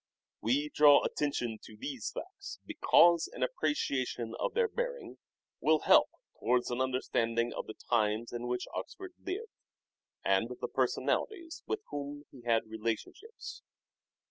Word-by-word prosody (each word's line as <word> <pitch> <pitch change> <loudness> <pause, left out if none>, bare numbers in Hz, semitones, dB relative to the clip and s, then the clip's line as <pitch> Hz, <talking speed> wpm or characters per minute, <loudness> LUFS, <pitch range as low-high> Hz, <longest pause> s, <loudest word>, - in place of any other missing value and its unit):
We 140 +6 +1
draw 145 -1 +7
attention 120 -6 -1
to 110 - -13
these 130 0 -4
facts 385 +3 -7
because 170 -1 +5
an - - -3
appreciation 130 - -1
of - - -1
their 470 0 +4
bearing - - -4 0.4
will 155 0 +3
help - - +6 0.3
towards 125 +1 +1
an 120 +1 -1
understanding 120 -2 0
of - - -5
the 110 - -7
times 110 0 0
in 120 0 -3
which 125 0 -1
Oxford 375 -1 -6
lived, 410 +5 -5 0.7
and - - +3
the 475 - -2
personalities 340 -7 -1
with 430 - -1
whom 145 0 -5
he 130 - -13
had 115 -1 +2
relationships. 115 - -5
140 Hz, 135 wpm, -32 LUFS, -, 0.7 s, draw